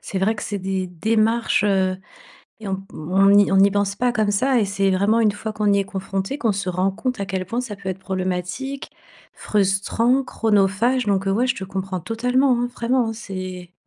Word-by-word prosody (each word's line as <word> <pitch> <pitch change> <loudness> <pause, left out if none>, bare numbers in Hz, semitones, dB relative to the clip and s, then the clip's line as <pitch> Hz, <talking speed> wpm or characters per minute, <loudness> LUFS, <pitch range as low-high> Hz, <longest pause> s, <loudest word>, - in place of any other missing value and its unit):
c'est 190 - -4
vrai 205 +4 +1
que 210 - -7
c'est 205 - -3
des 190 0 -2
démarches, 220 +5 +1
heu, 190 -2 +1 0.6
et 210 - -6
on 190 - -1
p 195 0 -14
on 190 +5 +2
n'y 205 0 +5
on 195 - +3
n'y 195 +1 +6
pense 200 0 0
pas 245 +1 +1
comme 215 -3 +1
ça 255 +4 +2
et - - +2
c'est 195 0 +1
vraiment 200 +5 +2
une 215 -2 +3
fois 215 +1 -5
qu'on 210 -1 +1
y 200 - +3
est 200 - 0
confronté, 195 +5 -4
qu'on 225 -6 +1
se 195 -1 -3
rend 185 +2 +1
compte 250 +3 -3
à 200 - -3
quel 190 -1 -3
point 230 +6 -2
ça 235 -5 -6
peut 195 -1 -7
être 190 0 -3
problématique, 190 +8 -4 0.4
frustrant, 210 +6 +1
chronophage, 225 +1 +1
donc 195 -1 +1
heu, 195 - +2
ouais, 235 +6 +1
je 255 - +1
te 190 - -5
comprends 190 -1 -4
totalement, 250 - +1
hein, 245 - -1
vraiment, 240 0 +1
hein, 225 - -2
c'est 185 -4 -7
200 Hz, 220 wpm, -22 LUFS, 190-230 Hz, 0.6 s, n'y